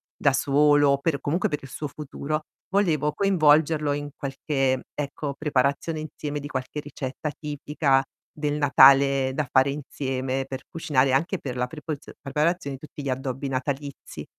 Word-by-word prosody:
da 140 - +3
solo 145 +1 +4
o 140 - +3
per 140 -1 0
comunque 165 +5 0
per 150 - -2
il 135 - -9
suo 150 - -4
futuro, 155 +1 -4 0.3
volevo 160 -7 +2
coinvolgerlo 155 -5 +3
in 145 0 -4
qualche, 135 -1 -1
ecco, 145 0 -4
preparazione 145 +2 0
insieme 150 -1 -5
di 145 - -6
qualche 130 +2 -4
ricetta 145 +1 -5
tipica 145 -2 +1 0.3
del 150 -1 -1
Natale 135 -1 +6
da 150 -4 -1
fare 135 +1 +4
insieme, 135 -2 -3
per 130 -1 -6
cucinare, 135 -5 +1
anche 170 +8 +1
per 130 -3 -5
la 125 0 0
prepozio 150 0 -7
preparazione 150 0 -1
di 155 - -10
tutti 145 - -9
gli 135 - -2
addobbi 130 +1 -3
natalizi. 140 +2 -4
145 Hz, 155 wpm, -25 LUFS, 135-150 Hz, 0.3 s, Natale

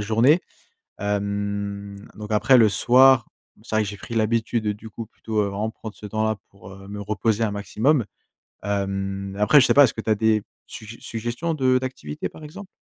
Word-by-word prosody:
journée. 115 - +3 0.6
Hem, 100 0 -3
donc 105 0 -8
après, 130 +5 +5
le 110 -3 +6
soir, 125 +2 +5 0.3
c'est 110 - -5
vrai 110 - +3
que 105 - -5
j'ai 100 - -8
pris 115 +4 -8
l'habitude, 110 0 0
du 105 +2 -6
coup, 115 +1 -7
plutôt, 110 -1 -3
vraiment 100 +2 -3
prendre 110 -1 -9
ce 105 - -9
temps 110 +1 -2
là, 110 -1 0
pour, 100 -1 -14
heu, 95 0 -12
me 105 0 -7
reposer 110 +2 0
un 105 - 0
maximum. 115 +7 +1 0.6
Hem, 100 -1 -3
après 110 +8 +6
je 130 - +5
sais - - +3
pas, 145 - +8
est-ce 125 - +2
que - - -6
tu 110 - -8
as - - +5
des 110 0 +2 0.2
suggé 110 +1 -9
suggestions 120 +9 -3
de 130 -4 +2
d'activités, 130 - -5
par 155 - -12
exemple? 190 +6 -10
110 Hz, 195 wpm, -23 LUFS, 100-115 Hz, 0.6 s, pas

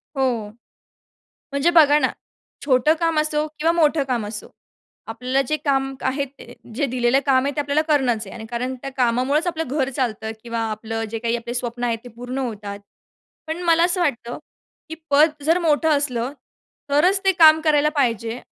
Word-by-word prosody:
हो. 245 -6 -1 1.0
म्हणजे 280 +4 +2
बघा 300 -3 +6
ना - - +2 0.6
छोटं 280 +2 +3
काम 330 -2 +1
असो 305 0 -1
किंवा 325 +2 +2
मोठं 315 -3 +2
काम 245 -5 -2
असो. 210 0 -7 0.6
आपल्याला 250 +4 -1
जे 305 - +1
काम 270 -2 0 0.2
आहे 280 +1 -2
ते 255 -3 -14 0.2
जे 280 +3 0
दिलेलं 250 +1 +1
काम 260 -1 +3
आहे 280 0 -2
ते - - +1
आपल्याला 290 +1 +1
करणंच 250 -8 +1
आहे. 195 - -10
आणि 220 -1 -8
कारण 250 +2 -3
त्या 275 - -5
कामामुळेच 255 +6 +1
आपलं 325 -5 -2
घर 270 -1 -1
चालतं 220 -4 -2
किंवा 230 -1 -4
आपलं 225 +1 -4
जे 225 - -3
काही 235 +1 -1
आपले 235 +1 -6
स्वप्न 240 0 -3
आहेत 230 -2 0
ते - - -9
पूर्ण 245 +2 -5
होतात. 210 -6 -5 0.7
पण 325 +3 -4
मला 335 0 +4
असं 360 +1 +1
वाटतं, 245 -7 -2 0.5
की 320 - -5 0.2
पद 300 +3 +5
जर 330 +4 +3
मोठं 320 -2 +2
असलं 255 -3 -2 0.6
तरच 360 +8 +3
ते 385 - +4
काम 315 -3 +7
करायला 300 -1 +3
पाहिजे. 230 -3 0
270 Hz, 180 wpm, -21 LUFS, 240-305 Hz, 1.0 s, काम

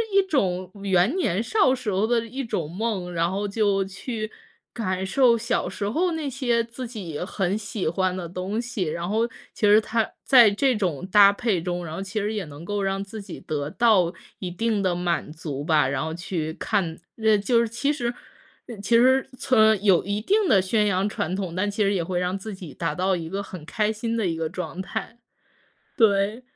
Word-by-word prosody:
一 395 - +7
种 185 - -1
圆 190 +4 +3
年 210 - +1
少 325 - +3
时 245 -5 -3
候 195 +3 +1
的 230 -1 +1
一 260 +4 -5
种 170 -9 -3
梦， 190 -2 -3
然 170 0 +1
后 200 +2 -2
就 200 -1 +1
去 215 +2 -5 0.4
感 190 -5 -2
受 235 +4 +4
小 235 +2 -1
时 200 -1 -3
候 345 +10 +1
那 315 -3 -2
些 245 -3 +1
自 235 +2 -7
己 185 -10 -6
很 190 +1 -1
喜 210 -1 -4
欢 185 +2 0
的 175 -3 -5
东 185 +6 -3
西。 240 -5 -3
然 170 +1 -3
后 225 +3 +1 0.3
其 - - 0
实 210 +1 +7
它 220 0 0 0.2
在 245 -5 +7
这 255 +5 +2
种 180 -6 -2
搭 200 0 +7
配 200 -5 0
中， 175 0 -3
然 155 - -6
后 190 - -4
其 200 +3 -3
实 210 +1 -1
也 205 -4 -3
能 150 +1 -11
够 205 +3 -2
让 195 0 -1
自 205 +2 -8
己 195 -3 -9
得 145 -1 -3
到 195 -7 +3 0.3
一 180 -2 -4
定 215 +3 0
的 185 -2 +2
满 175 -3 -1
足 150 -3 -5
吧。 150 -4 +3
然 130 0 -1
后 160 0 -3
去 165 -2 -3
看 175 -3 -1 0.2
呃， 220 -2 +4
就 230 +4 +2
是 235 - +2
其 240 +6 -1
实 240 -5 -2 0.5
呃， 235 -3 -8
其 200 +4 +1
实， 260 +2 +4
呃， 255 - -16
从 220 -5 +4
有 195 -4 +4
一 200 +2 -1
定 410 - +2
的 195 - +5
宣 210 +3 +1
扬 195 0 +1
传 185 -2 -2
统， 185 -4 -4
但 195 +3 0
其 205 +1 0
实 200 0 +2
也 180 -4 0
会 175 +1 -2
让 180 +2 -1
自 210 +2 -7
己 175 -7 -10
达 165 -3 -2
到 185 +2 +1
一 165 -2 -5
个 195 +4 -3
很 180 -5 -9
开 215 +5 0
心 225 +1 -3
的 220 -4 0
一 165 - -1
个 160 - -1
状 180 0 -5
态。 210 +4 -5 0.8
对， 210 +1 +3
200 Hz, 230 characters per minute, -24 LUFS, 180-230 Hz, 0.8 s, 一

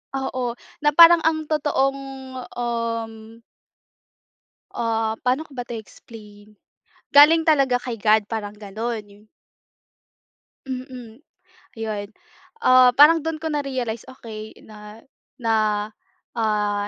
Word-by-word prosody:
Oo. 255 -3 -3 0.2
Na 295 - +4
parang 335 +2 +7
ang 315 -1 0
totoong, 280 -3 0 0.6
um 230 -1 -4 1.3
Ah, 225 -1 -2
paano 255 +4 +1
ko - - -27
ba 245 - -4
ito 240 - -8
i-explain? 210 -1 -16 0.6
Galing 300 +3 +7
talaga 270 -5 +3
kay 245 -2 -5
God 215 0 +2
parang 210 -2 -4
gano'n, 215 +3 -5
'yu 200 0 -18 1.5
Mm, 255 -1 -8 0.5
'yon. 215 -2 -4 0.6
Ah, 255 0 +7
parang 305 +4 +7
do'n 320 0 -3
ko 320 0 -4
narealize, 260 -6 -3
Okey. 220 -4 -10
na 210 +1 -13 0.4
na, 215 -2 0 0.5
ah, 210 -2 0
230 Hz, 105 wpm, -22 LUFS, 215-270 Hz, 1.5 s, parang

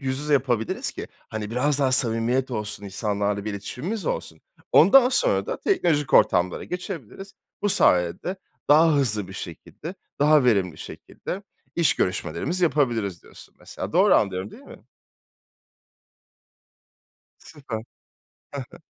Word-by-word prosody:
yüz 130 -1 -2
yüze 150 0 -2
yapabiliriz 125 -5 0
ki, - - -7 0.2
hani, 110 -1 -5
biraz 140 +4 +1
daha 135 -2 +2
samimiyet 120 +2 +1
olsun, 105 -3 -4
insanlarla 100 0 -2
bir 110 - -3
iletişimimiz 150 - -5
olsun. - - -4 0.3
Ondan 245 - +7
sonra - - +1
da - - -4
teknolojik 165 - +1
ortamlara 90 +1 +3
geçebiliriz. 180 - -7 0.3
Bu 205 - +2
sayede 90 - +2 0.3
daha 155 +1 +6
hızlı 110 -8 0
bir 95 - -9
şekilde, 150 - -8 0.3
daha 150 -2 +5
verimli 95 -9 +2
şekilde 195 +3 -8 0.3
iş 170 -2 +3
görüşmelerimizi 170 - -1
yapabiliriz 120 - 0
diyorsun, - - -16
mesela. - - -7
Doğru - - +5
anlıyorum, 95 +1 0
değil 270 - -14
mi? - - -14 2.6
Süper. 140 -7 -8
Ha 110 - -6 0.9
ha. - - -13
130 Hz, 125 wpm, -24 LUFS, 105-165 Hz, 2.6 s, Ondan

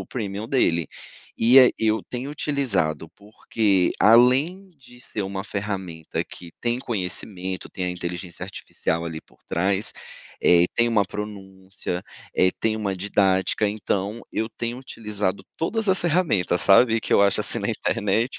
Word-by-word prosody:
o - - -14
premium 105 -1 -4
dele. 85 -11 +2 0.5
E 125 +4 +8
a 125 - +7
eu 110 0 +1
tenho 130 +3 -6
utilizado 110 - -1
porque, 100 -2 0
além 135 - +4
de 125 -3 -16
ser 110 -5 -4
uma 95 0 -4
ferramenta 95 -6 -4
que 85 - -10
tem 120 +1 -1
conhecimento, 95 -3 -4
tem 90 - -4
a 90 - -1
inteligência 90 0 -6
artificial 85 -3 -3
ali 80 -1 -5
por - - -26
trás, 95 +4 0 0.5
eh, 85 0 +6
tem 120 0 +3
uma 105 -4 +3
pronúncia, 95 -3 -6 0.3
eh, 95 - +4
tem 110 -1 +1
uma 100 -3 -2
didática, 95 +1 +1
então 105 +1 -2
eu 110 +1 -1
tenho 120 +2 -5
utilizado 105 -6 -4
todas 220 +6 -1
as 190 0 +4
ferramentas, 155 - +1
sabe, 115 +3 +5
que - - -3
eu 100 - +6
acho 100 -1 +3
assim - - -3
na - - -2
internet, 110 +5 0
105 Hz, 150 wpm, -24 LUFS, 95-120 Hz, 0.5 s, E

